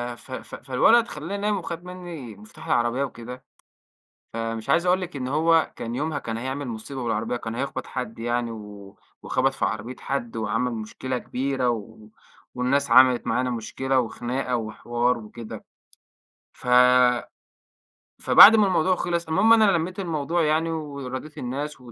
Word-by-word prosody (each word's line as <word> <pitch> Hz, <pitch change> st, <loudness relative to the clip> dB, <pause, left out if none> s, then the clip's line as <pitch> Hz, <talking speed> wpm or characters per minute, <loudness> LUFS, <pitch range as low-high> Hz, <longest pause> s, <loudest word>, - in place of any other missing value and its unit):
ف 130 Hz, -, -17 dB
ف -, -, -7 dB
فالولد 180 Hz, -, +3 dB
خلّاني 165 Hz, +7 st, -5 dB
نايم 210 Hz, 0 st, +1 dB
وخد 170 Hz, -2 st, -6 dB
منّي 175 Hz, -, -8 dB
مفتاح 110 Hz, +11 st, -14 dB
العربية 120 Hz, 0 st, +1 dB
وكده، 125 Hz, 0 st, -8 dB, 0.9 s
فمش 115 Hz, -1 st, -4 dB
عايز 170 Hz, +2 st, +3 dB
أقول 180 Hz, +1 st, +3 dB
لِك 180 Hz, -4 st, -6 dB
إن 125 Hz, -2 st, -4 dB
هو 160 Hz, +4 st, +2 dB
كان 115 Hz, +1 st, -5 dB
يومها 150 Hz, +1 st, -2 dB
كان 115 Hz, -3 st, -5 dB
هيعمل 130 Hz, +3 st, -4 dB
مصيبة 120 Hz, +3 st, -6 dB
بالعربية، 115 Hz, +1 st, -1 dB
كان 110 Hz, -1 st, -6 dB
هيخبَط 135 Hz, +2 st, -4 dB
حد 125 Hz, -3 st, -5 dB
يعني 120 Hz, 0 st, -1 dB
و 105 Hz, -2 st, -10 dB, 0.3 s
وخبَط -, -, +1 dB
في -, -, -1 dB
عربية 115 Hz, +4 st, -4 dB
حد 120 Hz, -4 st, -4 dB
وعمل 115 Hz, +3 st, -1 dB
مشكلة 120 Hz, +3 st, -4 dB
كبيرة 130 Hz, 0 st, -1 dB
و 110 Hz, -1 st, -6 dB, 0.5 s
والناس 130 Hz, +2 st, 0 dB
عملِت 130 Hz, 0 st, +6 dB
معانا 125 Hz, 0 st, 0 dB
مشكلة 130 Hz, +3 st, -1 dB
وخناقة 125 Hz, +2 st, -2 dB
وحوار 120 Hz, +2 st, -1 dB
وكده.ف 110 Hz, +1 st, -11 dB, 2.4 s
فبعد 225 Hz, -, +9 dB
ما 210 Hz, -2 st, +4 dB
الموضوع 185 Hz, 0 st, +2 dB
خلِص 170 Hz, -1 st, -2 dB
المهم 215 Hz, +8 st, +4 dB
أنا 215 Hz, -3 st, +5 dB
لميت 175 Hz, +2 st, -2 dB
الموضوع 165 Hz, -2 st, -1 dB
يعني 160 Hz, +2 st, +1 dB
وراضيت 145 Hz, -1 st, -6 dB
الناس 140 Hz, +2 st, -5 dB
و 120 Hz, -, -13 dB
130 Hz, 150 wpm, -24 LUFS, 120-160 Hz, 2.4 s, فبعد